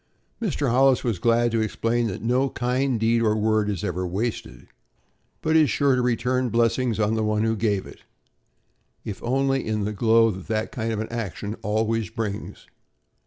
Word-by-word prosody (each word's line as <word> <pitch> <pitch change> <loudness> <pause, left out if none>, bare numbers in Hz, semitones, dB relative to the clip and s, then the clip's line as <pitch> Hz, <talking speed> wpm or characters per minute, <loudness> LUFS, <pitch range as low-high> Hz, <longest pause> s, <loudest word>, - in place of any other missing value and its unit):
Mr. 150 - 0
Hollis 130 +1 +4
was 115 -7 -1
glad 120 +2 +2
to 115 0 +1
explain 115 +2 0
that 95 - -5
no 125 +4 +1
kind 125 0 -1
deed 115 +1 +2
or 110 -2 +2
word 110 -1 +1
is 100 -5 -3
ever 90 +1 -2
wasted, 105 +6 -4 0.8
but 160 0 +1
is 155 -3 +5
sure 135 +5 +2
to 125 - +1
return 125 +1 0
blessings 115 0 +1
on 105 0 +1
the 110 -1 0
one 105 0 +1
who 115 0 +1
gave 105 -3 0
it, - - -13 1.0
if 100 - -6
only 135 +2 0
in 110 -1 -2
the 105 +1 -2
glow 115 +1 +4
that 110 +3 -2
a - - -14
kind 110 -1 -3
action 105 -2 -4
always 110 0 0
brings. 110 -3 -5
115 Hz, 170 wpm, -24 LUFS, 105-125 Hz, 1.0 s, is